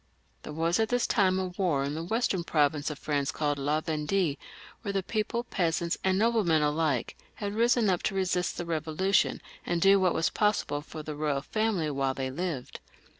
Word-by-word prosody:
There - - -8
was 165 +5 0
at 220 -1 +1
this 245 0 +1
time 190 -3 +2
a 190 - 0
war 175 -6 0
in 140 +2 -3
a 160 - -4
western 195 -2 0
province 150 -2 +1
of 150 - -6
France 140 -2 -1
called 145 -2 -1
La 150 +3 0
Vendue, 155 +1 0 0.5
where 200 - -3
the 195 -1 -1
people, 220 +4 -2
peasants 170 -6 0
and 190 0 +2
noblemen 205 -8 +3
alike, 150 -4 0 0.2
had 205 -1 -4
risen 235 +1 +3
np 185 -3 +2
to 195 - -1
resist 180 -2 0
the 175 - -3
Bevolution, 165 +4 +1 0.2
and 175 -1 -1
do 195 +3 +6
what 185 -2 +2
was 165 - +1
possible 210 -8 0
for 155 +1 -9
the 155 - -5
royal 145 -2 -1
family 210 -8 0
while 135 -1 -1
they 130 -1 -3
lived. 155 -3 -4
170 Hz, 190 wpm, -28 LUFS, 150-195 Hz, 0.5 s, do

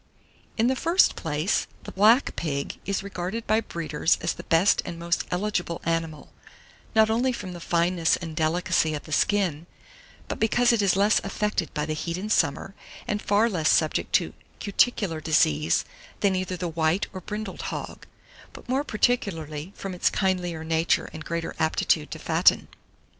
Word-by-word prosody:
In 225 - +3
the 260 +2 +2
first 335 +7 +3
place, 155 +4 -1 0.2
the - - -8
Black 220 +7 +4
Pig 140 -4 -3
is 195 0 -1
regarded 195 +3 -4
by 220 +1 +2
breeders 165 -6 0
as - - -1
the - - -9
best 165 +5 +3
and 170 - -6
most 170 0 -1
eligible 180 -3 -2
animal, 165 -2 -3 0.6
not 220 0 +5
only 245 +3 +2
from 190 -7 -6
the 175 - -8
fineness 170 0 +1
and 165 -3 -7
delicacy 160 0 +1
of 145 - -6
the 155 - -12
skin, 175 -2 +1 0.6
but - - -4
because 240 +2 +3
it 225 - +2
is 195 -3 +3
less 205 +3 +3
affected 200 -3 -2
by 150 - -1
the 155 - -2
heat 165 +2 -3
in 210 +3 -4
summer, 165 +2 +1 0.3
and 210 0 -1
far 210 +3 +3
less 170 -8 0
subject 155 -1 +1
to - - +2 0.3
cuticular 200 -5 +1
disease 155 -1 +2 0.4
than 195 -2 +3
either 185 0 -2
the 175 - -3
white 165 +3 0
or 185 - -6
brindled 210 +1 -6
hog, - - -7 0.5
but - - -13
more 265 +3 0
particularly 180 - -1
from 195 -1 -6
its 180 - +2
kindlier 180 -4 -1
nature 160 +1 +1
and 160 -1 -8
greater 170 0 -3
aptitude 160 0 +1
to - - -6
fatten. - - +3
180 Hz, 170 wpm, -25 LUFS, 160-210 Hz, 0.6 s, not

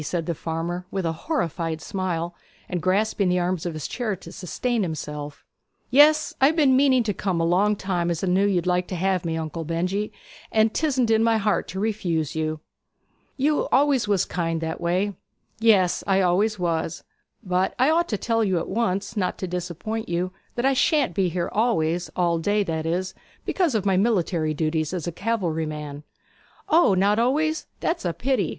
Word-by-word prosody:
said 165 +2 -2
the 170 - -1
farmer, 165 +3 -3
with 190 -2 -3
a 165 - +1
horrified 165 - -2
smile, 175 -1 -3 0.3
and 180 -2 -3
grasping 195 +2 +1
the 180 - +2
arms 180 -1 -1
of 170 - -3
his 155 - -4
chair 230 -5 -2
to 185 - -12
sustain 235 +6 -2
himself. 150 -4 -5 0.5
'Yes; 305 +3 +5
I 270 - +7
have 315 - +1
been 285 -5 +4
meaning 260 -2 +4
to 210 -2 -1
come 185 -3 -1
a - - +1
long 195 +5 +3
time, 180 -3 -1
as 170 0 -2
I - - 0
knew 190 +3 +3
you'd 180 -4 +1
like 180 0 +1
to 185 - -4
have 185 0 0
me, 165 -1 -2
Uncle 160 +1 -4
Benjy; 180 +6 -2 0.4
and 220 0 +3
'tisn't 260 -7 +1
in 220 0 +4
my 225 -1 +3
heart 210 -1 0
to 190 - -5
refuse 175 -8 -1
you.' 155 -1 -2 0.8
'You 295 +2 +1
always 275 -5 +3
was 200 -3 +2
kind 165 -1 -2
that 160 +1 -4
way!' 185 +4 0 0.5
'Yes; 205 -6 +3
I 195 -1 +3
always 200 +4 +2
was. 165 -3 -2 0.4
But 185 -1 0
I 260 +4 +4
ought 340 +2 +2
to 210 - 0
tell 225 +2 0
you 190 -4 +1
at 165 - -2
once, 200 -1 -1
not 185 -4 -1
to 185 - -4
disappoint 180 +5 -4
you, 175 +2 -1 0.2
that 240 - -1
I 270 - +4
shan't 280 - +2
be 185 0 +1
here 175 +1 -2
always 175 -7 +1
all 170 -2 +1
day, 205 +5 +1
that 160 -3 -3
is, 185 +3 -1 0.3
because 345 -10 +1
of 205 -2 0
my 190 -2 +3
military 175 -7 +1
duties 155 +2 -1
as 170 - -4
a 175 - -2
cavalry 170 -6 -1
man.' 150 -1 -6 0.7
'O, 315 - +5
not 200 +3 +3
always? 310 +7 +1
That's 335 - -1
a 175 -2 -1
pity!' 265 +5 0
185 Hz, 195 wpm, -24 LUFS, 170-220 Hz, 0.8 s, I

